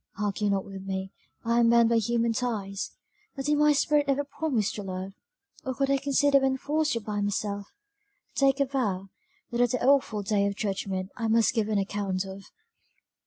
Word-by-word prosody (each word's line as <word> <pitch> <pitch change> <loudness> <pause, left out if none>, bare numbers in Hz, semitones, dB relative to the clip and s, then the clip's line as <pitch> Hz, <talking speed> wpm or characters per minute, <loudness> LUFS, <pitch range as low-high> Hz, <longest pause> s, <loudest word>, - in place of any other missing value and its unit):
Argue 205 0 -1
not 195 -1 0
with 195 -1 -8
me, 190 0 -4 0.3
I 235 +1 +2
am 235 -1 +5
bound 235 -1 +5
by 235 - +3
human 230 +1 +1
ties; 210 -5 -3 0.5
but 270 -2 -5
did 295 0 +2
my 300 0 +5
spirit 290 0 +2
ever 280 +1 +1
promise 275 -7 -1
to 210 - -6
love, 190 0 -5 0.5
or 260 -1 -3
could 275 +1 +1
I 275 - +4
consider 280 0 +3
when 265 0 +1
forced 305 +3 0
to 230 - -2
bind 205 -1 -2
myself 205 0 -2 0.7
to - - -4
take 275 0 +3
a 280 - +4
vow, 205 -8 -2 0.4
that 240 0 0
at 245 - +4
the 250 +1 -1
awful 260 -7 +3
day 200 0 +1
of 200 - -2
judgment 195 -2 -3
I 230 -2 -1
must 225 -1 +3
give 220 -3 0
an 215 - +1
account 195 -1 -1
of. 195 +1 -9
225 Hz, 200 wpm, -27 LUFS, 200-270 Hz, 0.7 s, am